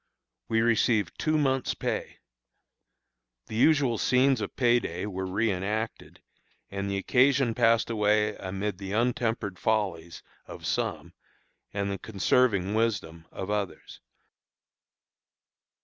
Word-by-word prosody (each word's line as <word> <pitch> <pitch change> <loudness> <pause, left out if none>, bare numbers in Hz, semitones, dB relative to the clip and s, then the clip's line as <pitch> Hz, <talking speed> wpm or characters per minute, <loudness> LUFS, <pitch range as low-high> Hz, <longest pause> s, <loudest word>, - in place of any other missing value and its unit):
"We 115 0 +2
received 115 -3 +1
two 155 0 +1
months' 135 -3 0
pay. - - -3 1.3
The - - -8
usual 135 -3 +3
scenes 130 -1 +3
of 105 - -5
pay 120 -2 +4
day 90 -3 -5
were 95 -2 -4
reënacted, 105 +2 -2 0.5
and 100 0 -3
the 100 - -1
occasion 130 +3 +3
passed 115 0 +3
away 105 -1 +2
amid 95 +1 -4
the 95 0 -5
untempered 115 -4 -1
follies 95 -7 -1 0.2
of - - -9
some - - -2 0.6
and 100 0 -2
the 100 - -4
conserving 100 -1 +1
wisdom 95 -8 -1
of 95 +2 -5
others. 105 -3 -4
105 Hz, 115 wpm, -27 LUFS, 100-120 Hz, 1.3 s, pay